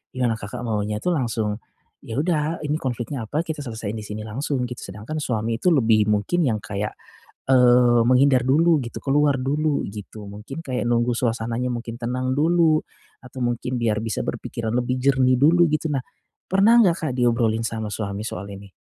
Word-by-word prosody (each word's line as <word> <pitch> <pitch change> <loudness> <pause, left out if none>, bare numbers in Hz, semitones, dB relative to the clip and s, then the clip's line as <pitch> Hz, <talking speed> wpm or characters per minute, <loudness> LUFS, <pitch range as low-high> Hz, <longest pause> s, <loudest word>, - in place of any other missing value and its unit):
ya 125 -1 +1
Kakak 105 +2 -7
maunya 105 -2 -2
itu - - -5
langsung, 115 -8 -1 0.5
ya 115 - -6
udah 160 -1 0
ini 150 0 0
konfliknya 125 -2 -4
apa, 150 +8 -1
kita 155 -3 -5
selesaiin 110 -3 -5
di 110 - -6
sini 105 +1 -6
langsung 135 +4 -2
git 125 - -7
sedangkan 105 +11 -7
suami 115 -5 -1
itu 180 +9 +2
lebih 110 -6 +3
mungkin 105 - +1
yang 110 -5 0
kayak, 105 0 -4 0.6
eee, 125 -2 +5
menghindar 130 0 +4
dulu 160 +4 +4
gitu, 120 -2 -6
keluar 145 0 +2
dulu 145 +3 0
gitu, 105 +1 -9
mungkin 115 +10 -8
kayak 125 -2 -2
nunggu 120 0 +2
suasananya 120 +1 -1
mungkin 120 -1 -5
tenang 125 +2 -2
dulu, 160 +1 +3 0.4
atau 130 0 -12
mungkin 120 +1 -2
biar 115 -3 0
bisa 110 -2 -2
berpikiran 115 -2 -4
lebih 125 +1 0
jernih 130 -1 +3
dulu 170 +4 +5
gitu. 155 +1 0
Nah, 135 - -1 0.5
pernah 200 +5 +5
nggak 180 -6 +5
Kak 140 - -1
diobrolin 115 -2 +2
sama 110 -1 -4
suami 100 0 -4
soal 100 -3 -5
ini? 100 +1 -11
125 Hz, 175 wpm, -23 LUFS, 110-145 Hz, 0.6 s, eee